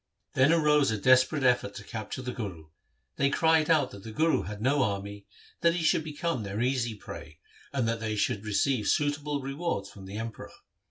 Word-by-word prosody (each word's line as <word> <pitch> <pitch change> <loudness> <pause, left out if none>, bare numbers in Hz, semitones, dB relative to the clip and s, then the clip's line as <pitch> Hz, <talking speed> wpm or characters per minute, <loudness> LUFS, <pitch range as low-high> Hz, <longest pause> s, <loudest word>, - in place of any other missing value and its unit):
Then 130 +4 +4
arose 150 -3 +4
a 110 - 0
desperate 130 +5 +4
effort 125 -5 +2
to 100 - -7
capture 115 +3 -6
the 125 - -3
Guru. 90 -10 -6 0.5
They 140 0 +3
cried 160 +1 +3
out 160 -3 +3
that 100 - -10
the 110 - -8
Guru 160 +8 +1
bad 105 0 -6
no 135 +5 +2
army, 100 -2 -3 0.3
that 170 0 +4
he 175 - -2
should 155 - +3
become 160 -2 -2
their 100 0 -4
easy 120 -2 0
prey, 80 -6 -10 0.3
and 130 -5 0
that 115 0 -1
they 110 -1 -2
should 105 0 0
receive 110 +2 +1
suitable 145 -1 0
rewards 140 -3 -3
from 95 -2 -12
the 100 +2 -6
Emperor. 115 0 -6
125 Hz, 195 wpm, -28 LUFS, 105-145 Hz, 0.5 s, Then